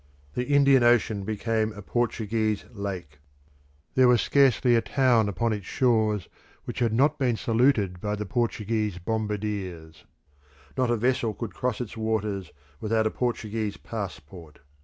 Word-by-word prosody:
The 125 - -2
Indian 140 -2 +5
Ocean 115 -4 +3
became 110 +1 -1
a 105 -1 -10
Portuguese 110 -2 -1
lake. 90 -8 -6 0.7
There 130 -1 +5
was 125 -1 +5
scarcely 130 -1 +3
a 115 - +3
town 120 -6 +2
upon 110 +4 0
its 100 -3 -6
shores 110 -6 +1 0.4
which - - -5
had 120 -3 +2
not 140 +7 +2
been 125 -4 +2
saluted 110 -7 +1
by 105 0 -1
the 105 0 -4
Portuguese 110 -3 -1
bombardiers. 100 -6 -4 0.7
Not 130 -2 +1
a 120 - +2
vessel 120 -2 0
could 115 0 -6
cross 125 -3 -2
its 120 -4 -5
waters 105 -4 -2 0.3
without 110 0 +1
a 110 - +1
Portuguese 110 -4 -2
passport. 85 -7 -8
110 Hz, 140 wpm, -26 LUFS, 100-120 Hz, 0.7 s, Indian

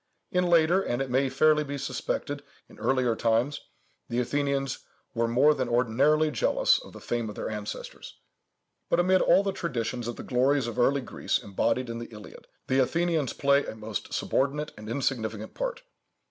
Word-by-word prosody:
In 180 -2 +2
later, 170 +2 +4
and 120 -8 -2
it 135 -2 -2
may 135 +1 +2
fairly 150 +3 +3
be 140 -1 -5
suspected 140 +1 -3 0.3
in - - -17
earlier 130 -3 +1
times, 115 +6 +1 0.5
the 120 - 0
Athenians 140 +1 -1 0.3
were 115 -1 +1
more 130 +6 +4
than 130 -4 -2
ordinarily 135 +6 +3
jealous 120 - +3
of - - -12
the - - -10
fame 120 -2 -2
of 105 - -8
their - - -4
ancestors. 105 -1 -7 0.7
But, - - +2
amid 185 +1 +4
all 195 - +5
the 200 - 0
traditions 120 -9 -3
of 120 - -4
the - - -8
glories 135 +2 +2
of 120 0 -4
early 135 +3 +3
Greece 125 - -1
embodied 120 +5 -1
in 115 0 -5
the 120 - -6
Iliad, 105 -1 -12 0.2
the 130 - +1
Athenians 160 0 +1
play 140 0 +3
a - - -7
most 110 -2 -5
subordinate 145 +3 -1
and 105 0 -9
insignificant 110 -4 -2
part. - - -4
135 Hz, 175 wpm, -27 LUFS, 115-150 Hz, 0.7 s, all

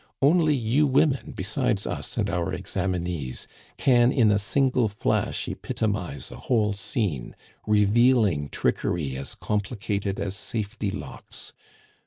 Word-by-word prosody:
"Only 155 +1 +4
you 130 +5 +2
women, 135 0 +2
besides - - 0
us - - -4
and - - +1
our 85 -1 -1
examinees, 90 -8 -2 0.3
can 120 -2 +4
in 115 -6 +4
a 105 - +3
single 125 +2 +2
flash 105 0 -1
epitomize 95 - -3
a - - -8
whole 110 -4 +1
scene, 100 - -2 0.3
revealing 105 - +4
trickery 75 -6 -1
as 70 +1 -5
complicated 105 -1 -2
as 100 -1 -2
safety 105 0 -3
locks. 100 0 -7
105 Hz, 120 wpm, -26 LUFS, 95-120 Hz, 0.3 s, Only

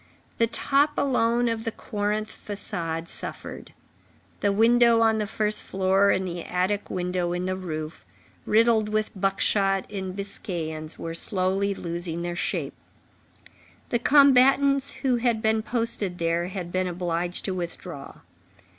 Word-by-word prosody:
The 230 - +4
top 285 +5 +2
alone 240 -3 +2
of 225 -1 -1
the 225 - -2
Corinthe 210 0 -3
façade 170 -5 -4
suffered; - - -8 0.7
the 205 - +2
window 230 +2 +5
on 220 -1 +3
the 210 - -1
first 215 0 -1
floor, 195 +1 +2
and 190 -1 +1
the 175 -1 -4
attic 185 +3 -1
window 180 -1 -1
in 180 +1 -2
the 185 0 -1
roof, 155 -4 -5 0.4
riddled 220 -1 +4
with 215 0 0
buckshot 195 0 +1
and 190 -2 -4
biscaïens, 165 -6 -5
were 165 0 -5
slowly 195 +3 0
losing 170 -1 -4
their 175 0 -3
shape. - - -2 1.2
The 240 - +1
combatants 275 +1 +5
who 255 -2 +3
had 235 -2 +1
been 220 0 +2
posted 225 -6 -2
there 170 +1 0
had 180 -2 -5
been 185 0 0
obliged 175 0 -2
to 190 - -1
withdraw. 175 -4 -7
195 Hz, 135 wpm, -26 LUFS, 175-225 Hz, 1.2 s, window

